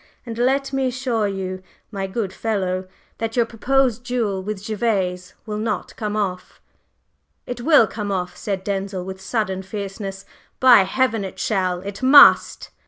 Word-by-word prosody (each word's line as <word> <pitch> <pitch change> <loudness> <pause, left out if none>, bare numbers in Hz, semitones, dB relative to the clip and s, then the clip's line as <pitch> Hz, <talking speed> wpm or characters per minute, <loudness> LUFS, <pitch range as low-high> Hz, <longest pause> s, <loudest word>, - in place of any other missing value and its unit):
And 230 -2 -6
let 270 +3 0
me 270 -1 +1
assure 250 -4 -1
you, 185 -1 -4 0.3
my 195 -2 -3
good 190 -1 -3
fellow, 190 -4 -2 0.3
that 225 0 -3
your 240 -2 +3
proposed 245 +1 0
duel 230 -6 -1
with 200 0 -5
Gervase 195 -5 -1
will 210 -1 -4
not 215 -3 -3
come 210 -1 -3
off!" 190 -3 -3 0.9
"It 245 -1 -6
will 295 -3 +6
come 210 0 -5
off!" 180 -2 -3
said 195 -2 -4
Denzil, 195 -2 -3
with 190 0 -7
sudden 190 -2 -2
fierceness. 195 0 -6 0.3
"By 245 -6 +7
Heaven, 225 +1 0
it 190 - -7
shall! 185 -6 -1
it 195 +1 -7
must!" 275 +2 +6
210 Hz, 155 wpm, -21 LUFS, 190-235 Hz, 0.9 s, By